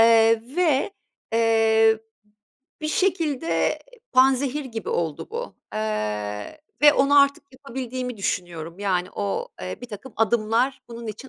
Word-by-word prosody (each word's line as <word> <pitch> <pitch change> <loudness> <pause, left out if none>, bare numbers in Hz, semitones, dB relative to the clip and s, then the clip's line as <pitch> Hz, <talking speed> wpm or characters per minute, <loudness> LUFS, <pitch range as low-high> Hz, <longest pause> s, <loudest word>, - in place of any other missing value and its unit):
eee, 225 0 +6
ve, 330 0 +2 0.4
eee, 225 -1 +4 0.8
bir 305 - -2
şekilde 330 -4 +1 0.3
panzehir 270 +2 +3
gibi 230 -4 -6
oldu 160 -4 -2
bu, 480 +2 -5 0.2
eee, 105 - -3 0.2
ve 295 - +9
onu 285 0 +5
artık 280 0 +2
yapabildiğimi 255 -2 -5
düşünüyorum. 175 -3 -3
Yani, 185 -3 0
o, 205 - -2
eee, - - -5
birtakım 235 +1 -9
adımlar 230 +4 +1
bunun 235 -1 -8
için 215 +5 -7
230 Hz, 115 wpm, -24 LUFS, 215-275 Hz, 0.8 s, ve